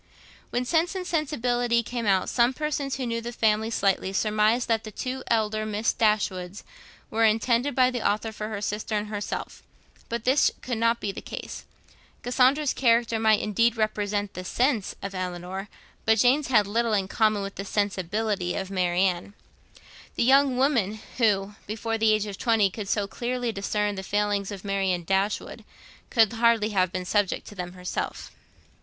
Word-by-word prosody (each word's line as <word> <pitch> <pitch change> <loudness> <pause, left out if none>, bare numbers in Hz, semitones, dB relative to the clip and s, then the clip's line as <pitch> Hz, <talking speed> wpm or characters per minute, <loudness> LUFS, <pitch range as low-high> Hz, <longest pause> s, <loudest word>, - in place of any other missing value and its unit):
When 245 +1 -1
'Sense 335 +6 +1
and 370 -1 -3
Sensibility' 245 -7 0
came 235 -1 -4
out, 190 -2 +3
some 240 +1 +2
persons, 295 -2 -2
who 265 - -3
knew 230 -1 -2
the 235 +1 -5
family 220 -1 +1
slightly, 195 -3 0
surmised 215 +3 +2
that 225 -1 +1
the 215 - -7
two 255 +5 -4
elder 215 -1 +1
Miss 215 +1 0
Dashwoods 200 -3 0 0.5
were 225 +1 +1
intended 235 +5 +2
by 255 -1 +4
the 245 -2 -3
author 215 +2 0
for 215 0 -5
her 210 -2 -4
sister 210 +1 -2
and 210 0 -2
herself; 205 -1 -5 0.5
but 235 -1 -3
this 260 +4 +4
could 245 -3 -3
not 230 +1 +2
be 200 - -2
the - - -8
case. - - -7 0.6
Cassandra's 260 +4 +3
character 230 -2 +2
might 220 -1 +4
indeed 230 +3 +1
represent 205 -2 -1
the 180 - -6
'sense' 240 +1 0
of 195 0 -4
Elinor, 185 +2 -5 0.3
but 220 0 +3
Jane's 270 +5 +3
had 215 -5 +4
little 225 +2 0
in 195 -2 +1
common 215 0 +1
with 195 0 -5
the 195 - -6
'sensibility' 200 -1 -1
of 190 0 -4
Marianne. 180 +1 0 0.8
The - - +1
young 270 +1 +4
woman 235 -7 +1 0.2
who, 205 -4 +2
before 225 +2 -3
the 220 0 +4
age 215 -1 +2
of 200 -2 -7
twenty, 225 -5 +3
could 205 0 -6
so 205 -1 +1
clearly 240 +3 -3
discern 210 0 -1
the 190 - -5
failings 205 0 -1
of 200 -1 -8
Marianne 190 -3 0
Dashwood, 195 +4 -1 0.5
could 225 -2 +4
hardly 230 -2 +3
have 185 -4 +1
been 185 0 -4
subject 205 0 0
to - - -11
them 180 -1 -6
herself. 180 -1 -5
215 Hz, 175 wpm, -26 LUFS, 200-235 Hz, 0.8 s, by